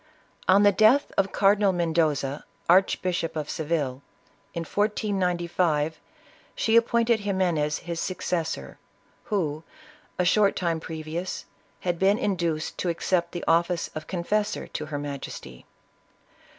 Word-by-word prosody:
On 195 +2 +6
the 205 - +7
death 220 +8 +4
of 195 0 +1
Cardinal 200 0 +4
Mendoza, 160 -5 0 0.2
Archbishop 180 -2 +2
of 150 -1 -3
Seville, 145 -5 -2 0.5
in 170 - -2
1495, 175 -6 0 0.6
she 225 - +1
appointed 235 0 +4
Ximenes 180 -7 0
his 170 -1 -5
successor, 180 -3 -3 0.5
who, 160 -8 -1 0.6
a 180 - +1
short 200 +2 +4
time 170 -2 0
previous, 160 +3 -5 0.4
had 175 -2 -1
been 195 +2 +4
induced 170 -8 -1
to 180 - 0
accept 170 0 0
the 175 - -5
office 170 +1 +2
of 155 0 -6
confessor 205 +4 -1
to 155 - -5
her 145 -1 -4
majesty. 140 - -7
175 Hz, 120 wpm, -26 LUFS, 160-195 Hz, 0.6 s, the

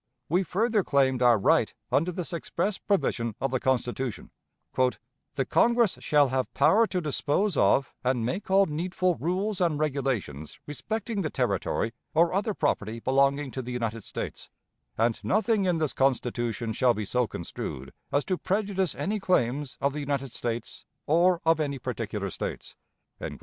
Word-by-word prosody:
We 175 +5 +3
further 210 +3 +1
claimed 130 -4 +2
our 120 -2 +6
right 100 - +3 0.2
under 165 +6 +2
this 175 0 -5
express 175 +4 -2
provision 115 - 0
of 135 - -1
the 130 - 0
Constitution: 125 -2 -2 0.4
"The 130 +1 -2
Congress 235 -4 +3
shall 145 -3 +3
have 130 -1 -1
power 225 +3 +5
to 185 -3 -2
dispose 155 +5 0
of 135 -1 +3
and 125 -2 +1
make 180 - -3
all 195 +1 +5
needful 180 +3 0
rules 190 +4 -1
and 165 -4 +2
regulations 135 - -2
respecting 215 +7 -3
the 155 - -1
Territory 115 -2 -1 0.2
or 170 +2 +4
other 200 +2 0
property 110 +3 -1
belonging 140 +2 +2
to 130 - -4
the 125 0 -6
United 115 -3 -3
States; - - -6 0.5
and 115 +1 +1
nothing 215 0 +2
in 180 -2 +2
this 155 -6 0
Constitution 120 -3 0
shall 125 +2 +3
be 105 - -3
so 125 +3 +1
construed 70 -7 -6 0.2
as 145 - +1
to 185 -2 -1
prejudice 195 -3 0
any 210 +2 -2
claims 140 -7 0
of 140 0 +1
the 150 - -4
United 140 -3 -2
States 115 -1 -4 0.2
or 170 +3 +3
of 165 0 +4
any 140 -2 -1
particular 110 -6 -4
States." - - -6
140 Hz, 155 wpm, -27 LUFS, 125-185 Hz, 0.5 s, our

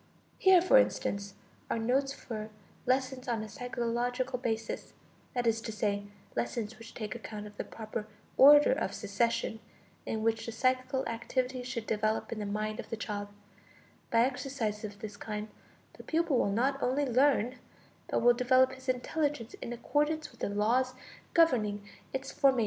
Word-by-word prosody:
Here, 375 -2 +7
for - - +7
instance, 200 - 0 0.3
are - - 0
notes 260 +5 +1
for 220 -5 -6 0.4
lessons 260 0 0
on 230 -3 0
a - - -6
psychological 245 +3 -2
basis, 225 -2 -3 0.4
that 245 -1 0
is 225 -1 +2
to 225 - -5
say, 205 -1 -1 0.3
lessons 210 - -2
which 230 0 -12
take 215 -2 -4
account 215 -3 -7
of 210 0 -11
the - - -2
proper 215 -1 -6 0.3
order 290 +2 +8
of 200 -7 -1
succession 225 +2 0 0.5
in 220 -1 -2
which 225 0 +1
the - - -2
psychical 255 +3 +1
activities 250 +2 -2
should 235 -3 -4
develop 215 0 0
in 230 - -3
the 205 - -3
mind 215 +1 -2
of - - -6
the 225 - -3
child; 205 -2 -4 0.8
by 230 - +4
exercises 250 -4 -1
of 205 -1 -7
this 210 -2 -6
kind, 210 0 -5 0.4
the - - -12
pupil 320 -5 +1
will - - +2
not 270 +6 +1
only 270 +3 +1
learn, 255 -1 +3 0.5
but - - +1
will 240 0 +7
develop 255 +1 +4
his 260 0 -8
intelligence 255 -1 -1
in - - -5
accordance 295 +6 0
with - - -20
the - - -1
laws 240 +5 +1 0.4
governing 215 - +3 0.2
its 265 0 -4
formation. 270 -2 +4
235 Hz, 165 wpm, -31 LUFS, 215-260 Hz, 0.8 s, order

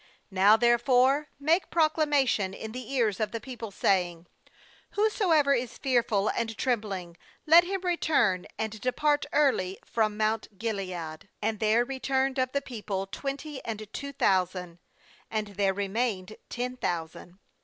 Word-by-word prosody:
3Now 200 +4 +6
therefore 255 +4 +3
make 320 +6 +2
proclamation 290 - +2
in 220 - -7
the 250 +1 -7
ears 230 -7 +1
of 215 - -1
the 230 - -3
people, 230 -1 -7
saying: 180 -3 0 0.7
Whoso 420 -2 +1
ever 295 -4 +5
is 245 -2 -2
fearful 235 -6 +1
and 225 -2 -2
trembling, 200 -8 -2 0.3
let 335 +3 +7
him 385 +1 -2
return 310 - +1
and 220 -1 -4
depart 290 +3 +1
early 250 -11 +2
from 215 -2 0
mount 215 -1 -1
Gilead.' 185 -6 -4
And 215 0 -2
there 220 +2 +3
returned 265 0 -1
of 255 0 0
the 280 0 -1
people 205 -6 -4
twenty 275 +7 -6
and 215 -2 -5
two 280 0 -5
thousand; 180 -6 0 0.5
and 215 -1 -2
there 200 -1 +1
remained 200 0 -2
ten 250 +1 -4
thousand. 175 -1 -4
225 Hz, 140 wpm, -28 LUFS, 195-275 Hz, 0.7 s, let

